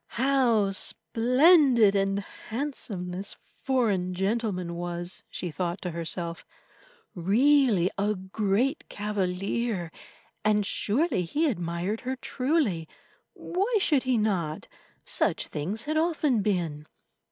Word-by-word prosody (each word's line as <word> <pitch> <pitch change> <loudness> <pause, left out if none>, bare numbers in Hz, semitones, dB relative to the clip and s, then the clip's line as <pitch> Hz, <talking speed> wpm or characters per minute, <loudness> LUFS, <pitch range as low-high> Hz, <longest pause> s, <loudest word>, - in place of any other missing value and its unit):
How 240 -6 +3
splendid 250 - +4
and 195 0 +1 0.3
handsome 220 -8 -3
this 190 +3 -3 0.3
foreign 205 -9 +1
gentleman 195 -3 -1
was, 175 +1 -5
she 175 - -5
thought 175 +4 -3
to 180 - -3
herself, 170 +1 -4 0.7
really 210 - +3
a 210 +1 +1
great 205 - -1
cavalier, 200 -1 -2 0.5
and 210 -1 +2
surely 220 - +1
he 295 - 0
admired 175 - -2
her 260 +1 -3
truly. 255 - -1 0.5
Why 395 +7 -2
should 300 -8 +2
he 255 -2 +1
not? 185 -8 -1 0.4
Such - - 0
things 190 +10 -3
had 310 +1 -1
often 310 -8 +1
been. 170 -7 -2
205 Hz, 105 wpm, -27 LUFS, 180-255 Hz, 0.7 s, splendid